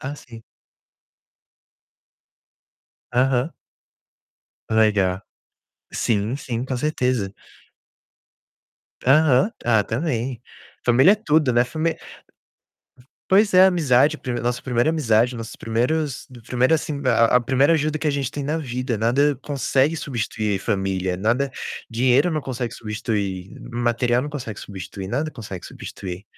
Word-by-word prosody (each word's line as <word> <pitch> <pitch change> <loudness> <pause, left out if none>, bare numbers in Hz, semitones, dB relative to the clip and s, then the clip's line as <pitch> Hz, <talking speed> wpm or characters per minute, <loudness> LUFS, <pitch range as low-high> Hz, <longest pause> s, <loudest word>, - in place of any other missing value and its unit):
Ah, 135 +2 -5
sim. 115 -4 -13 2.7
Aham. 130 +3 +2 1.2
Legal. 105 -4 +2 0.7
Sim, 110 +2 0
sim, 125 -4 -4
com 130 -1 -3
certeza. 125 -8 -1 1.7
Aham. 140 - +5
Ah, 110 -3 +4
também, 125 -2 -2 0.4
família 130 +9 +6
é - - +4
tudo, 155 - +2
né, 120 0 +4
famí 160 +5 -1 1.4
Pois 200 +2 +5
é, 185 +1 +8
amizade, 155 -5 +3
prime 125 -5 -4
nossa 120 +1 -2
primeira 120 +1 +1
amizade, 125 -6 +2
nossos 115 -1 -7
primeiros 125 +5 -1 0.2
primeiro, 125 +4 +2
assim, 150 -2 -3
a 115 -1 +4
a - - +4
primeira 135 +6 +3
ajuda 155 0 0
que 155 - -3
a - - +3
gente 140 -3 -2
tem 145 - -4
na 150 +3 -1
vida, 125 -5 -3
nada 135 +6 +2
consegue 140 +1 +1
substituir 110 -6 -2
família, 95 -1 -1
nada 115 +9 0 0.4
dinheiro 125 +7 +3
não 155 -2 -1
consegue 125 -3 -4
substituir, 105 -4 -4 0.2
material 120 +1 +1
não 145 - -5
consegue 120 -7 -6
substituir, 95 -1 -8
nada 145 +8 -1
consegue 100 - -8
substituir. 90 0 -8
125 Hz, 120 wpm, -22 LUFS, 110-145 Hz, 2.7 s, é